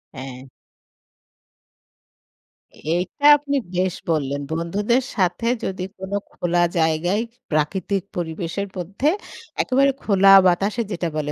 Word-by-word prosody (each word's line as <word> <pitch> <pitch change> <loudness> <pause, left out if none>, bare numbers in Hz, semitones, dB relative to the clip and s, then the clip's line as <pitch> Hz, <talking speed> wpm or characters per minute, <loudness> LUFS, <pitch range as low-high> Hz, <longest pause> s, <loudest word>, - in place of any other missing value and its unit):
হ্যাঁ। 130 -1 -8 2.5
এইটা 180 - -2
আপনি 285 0 -3 0.2
বেশ 185 0 +1 0.2
বললেন! 145 -3 0
বন্ধুদের 205 +10 0
সাথে 185 +3 0 0.2
যদি 185 -1 -3
কোন 190 +1 -8 0.2
খোলা 175 0 0 0.2
জায়গায়, 165 +5 +1 0.3
প্রাকৃতিক 180 +5 0
পরিবেশের 170 +3 -3
মধ্যে 195 - -2 0.5
একেবারে 275 +2 +3
খোলা 195 -2 +4 0.2
বাতাসে 200 +6 +1
যেটা 175 -2 -2
বলে, 150 -1 -2
180 Hz, 100 wpm, -22 LUFS, 160-200 Hz, 2.5 s, খোলা